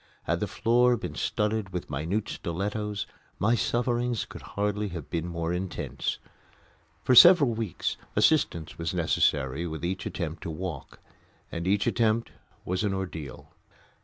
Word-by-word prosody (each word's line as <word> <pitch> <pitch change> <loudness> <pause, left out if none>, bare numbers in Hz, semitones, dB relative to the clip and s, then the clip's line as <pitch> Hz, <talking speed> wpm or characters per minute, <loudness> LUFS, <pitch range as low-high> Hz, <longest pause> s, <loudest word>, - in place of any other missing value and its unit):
Had - - 0
the - - -1
floor 120 +2 +3
been - - -5
studded 105 -1 -1
with 90 -5 -5
minute 85 +10 -1
stilettos 100 +4 -3 0.3
my 110 +5 +2
sufferings 120 +1 0
could - - -10 0.2
hardly 105 +1 0
have 85 -6 -7
been 85 +1 -2
more 85 0 -2
intense. 90 +1 -3 0.9
For 130 - +3
several 145 -2 +9
weeks 110 -6 -2 0.2
assistance 85 - +2
was 85 +2 -2
necessary 75 -2 +1
with 80 +1 -5
each 90 +1 -2
attempt 85 -2 -4
to - - -5
walk, 80 -2 -6 0.5
and 85 +2 -4
each 100 +1 +2
attempt 115 0 +1 0.3
was 90 +3 -1
an 100 -2 0
ordeal. 80 -8 -6
95 Hz, 140 wpm, -28 LUFS, 85-110 Hz, 0.9 s, several